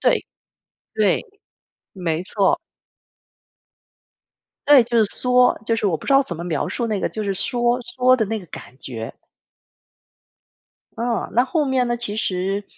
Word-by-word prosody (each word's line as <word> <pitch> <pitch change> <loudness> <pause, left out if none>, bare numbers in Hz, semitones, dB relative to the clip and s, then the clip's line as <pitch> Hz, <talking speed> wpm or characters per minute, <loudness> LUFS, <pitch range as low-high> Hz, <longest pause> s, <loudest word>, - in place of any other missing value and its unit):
对。 - - +2 0.7
对， 210 -4 +2 0.7
没 170 -3 -2
错。 210 - +1 2.1
对， 285 -3 +8
就 235 +1 -2
是 220 - +5
嗦， 250 +4 +3
就 230 0 +1
是 220 -2 -1
我 170 - +1
不 - - -13
知 275 - +2
道 275 - +6
怎 175 - -6
么 170 - -6
描 160 -5 -2
述 235 - -2
那 210 -3 -2
个 - - 0
就 215 -1 -4
是 195 - -1
嗦 240 +5 0
嗦 250 +2 +2
的 225 -4 +1
那 220 +2 -2
个 185 - -12
感 130 - -11
觉。 115 -5 -6 1.8
嗯， 235 0 -2
那 245 +2 +4
后 305 +2 0
面 265 -2 +1
呢， 240 - 0
其 225 -3 -4
实 195 0 -1
220 Hz, 170 characters per minute, -21 LUFS, 190-250 Hz, 2.1 s, 对